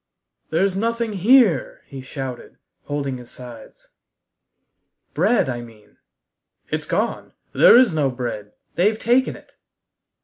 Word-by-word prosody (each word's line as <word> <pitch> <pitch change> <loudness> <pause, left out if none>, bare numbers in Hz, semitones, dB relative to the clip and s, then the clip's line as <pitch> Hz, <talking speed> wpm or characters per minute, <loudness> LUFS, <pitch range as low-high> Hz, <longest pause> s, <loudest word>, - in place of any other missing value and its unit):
"There's 185 +4 0
nothing 230 +1 -2
here!" 205 - +3
he 135 -1 -9
shouted, 130 -2 -8 0.3
holding 140 -2 -3
his 120 - -13
sides. 120 -3 -13 1.2
"Bread, 200 - +2
I 120 -2 -4
mean." 115 -3 -16 0.7
"It's - - -3
gone. - - -2 0.2
There - - +7
is 245 -8 +4
no 150 -3 +1
bread. 120 -5 -6 0.2
They've 210 +5 +1
taken 245 +4 +1
it!" - - -17
150 Hz, 115 wpm, -21 LUFS, -, 1.2 s, There